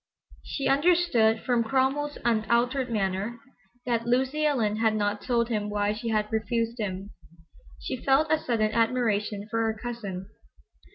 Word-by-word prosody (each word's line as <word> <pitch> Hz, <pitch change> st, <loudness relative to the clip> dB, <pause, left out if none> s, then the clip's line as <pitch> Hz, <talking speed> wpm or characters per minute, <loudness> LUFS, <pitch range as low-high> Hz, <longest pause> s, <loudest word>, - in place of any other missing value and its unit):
She 275 Hz, -, -3 dB
understood 275 Hz, -7 st, +3 dB
from 245 Hz, -3 st, +2 dB
Cromwell's 270 Hz, +5 st, 0 dB
unaltered 235 Hz, +3 st, +1 dB
manner 205 Hz, +2 st, -2 dB, 0.5 s
that 235 Hz, -1 st, -1 dB
Lucy 265 Hz, +5 st, +1 dB
Ellen 220 Hz, -8 st, +1 dB
had 220 Hz, -1 st, +2 dB
not 205 Hz, -1 st, -1 dB
told 235 Hz, -2 st, 0 dB
him 210 Hz, -3 st, -1 dB
why 205 Hz, 0 st, 0 dB
she 230 Hz, +2 st, -4 dB
had 215 Hz, -1 st, 0 dB
refused 230 Hz, +2 st, -1 dB
him. 195 Hz, -1 st, -4 dB, 0.7 s
She 255 Hz, -, -5 dB
felt 280 Hz, +3 st, +3 dB
a 315 Hz, -, +4 dB
sudden 220 Hz, -6 st, 0 dB
admiration 220 Hz, -3 st, 0 dB
for 230 Hz, +1 st, -1 dB
her 220 Hz, -1 st, 0 dB
cousin. 205 Hz, -6 st, -5 dB
230 Hz, 145 wpm, -27 LUFS, 215-255 Hz, 0.7 s, a